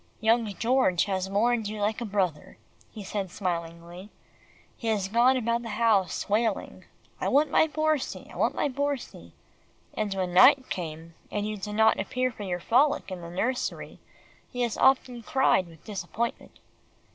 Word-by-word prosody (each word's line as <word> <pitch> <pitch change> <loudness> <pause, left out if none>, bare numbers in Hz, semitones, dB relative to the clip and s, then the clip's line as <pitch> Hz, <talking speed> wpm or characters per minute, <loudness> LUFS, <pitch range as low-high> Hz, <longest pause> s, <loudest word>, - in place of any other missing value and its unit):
"Young 225 +1 +2
George 235 -7 +2
has 190 -1 -2
mourned 225 +2 +1
you 210 0 -5
like 210 +3 -1
a - - -2
brother," 190 -7 -2 0.3
he 210 - -9
said 195 -1 -4
smilingly. 170 +1 -5 0.7
"He 230 - -7
has 210 -4 0
gone 240 +5 +4
about 235 -1 0
the 230 - -7
house 215 -6 +1
wailing, 215 0 -1 0.3
'I - - -2
want 295 +2 +3
my 320 - +4
Borsie 310 -2 -1
I - - -13
want - - 0
my - - +1
Borsie,' 285 0 -4 0.6
and 215 -2 -2
when 185 -2 -2
night 260 +8 +6
came, 165 -1 -5 0.2
and 205 0 -2
you 215 - -3
did 210 +1 -6
not 220 +1 +4
appear 255 +6 -1
for 225 - -12
your 180 -3 -3
frolic 260 - +2
in 185 -1 -6
the 170 - -8
nursery, 235 +9 -3 0.5
he 250 - -5
has 235 -3 0
often 255 -2 +2
cried 230 -6 +2
with 165 -2 -17
disappointment." 210 +3 -4
215 Hz, 165 wpm, -27 LUFS, 190-245 Hz, 0.7 s, night